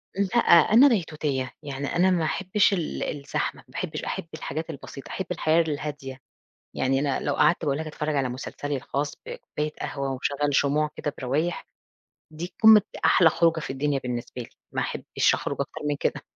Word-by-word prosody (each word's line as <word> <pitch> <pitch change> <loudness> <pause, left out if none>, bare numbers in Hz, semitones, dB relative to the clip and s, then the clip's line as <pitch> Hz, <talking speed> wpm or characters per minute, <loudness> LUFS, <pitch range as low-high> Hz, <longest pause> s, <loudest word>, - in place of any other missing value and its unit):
لأ، 200 +4 0 0.4
أنا 265 +5 +9
بيتوتية، 150 - -1
يعني 140 -1 -4
أنا 185 +2 +4
ما 170 -3 +1
أحبش 195 +4 +2
ال 170 -5 -2
الزحمة، 140 -2 -3
ما - - -21
باحبش - - -4
أحب - - -4
الحاجات 160 0 -5
البسيطة، 135 0 -9
أحب 190 - -4
الحياة 165 -1 +3
الهادية. 145 -4 -4 0.6
يعني 135 +1 +1
أنا 140 -2 0
لو 145 - -1
قعَدت 175 - +3
باقول 140 -1 +1
لك 155 0 -4
أتفرج 150 0 -3
على 135 -2 +1
مسلسلي 140 +3 -4
الخاص 140 +2 -3
بكوباية 150 0 -5
قهوة 140 -1 -3
وأشغل 140 +2 -1
شموع 150 +2 +2
كده 145 - -3
بروايح، 150 +7 -1 0.7
دي 170 +4 -7
قمة 220 -1 +9
ده - - -8
أحلى 170 -3 +6
خُروجة 165 0 +2
في - - -6
الدنيا 140 +1 0
بالنسبة 125 0 -5
لي، 115 - -10 0.2
ما - - 0
أحبش - - 0
أخرُج - - -3
أكتر - - -4
من 145 - +1
كده، - - -1
150 Hz, 175 wpm, -25 LUFS, 140-165 Hz, 0.7 s, أنا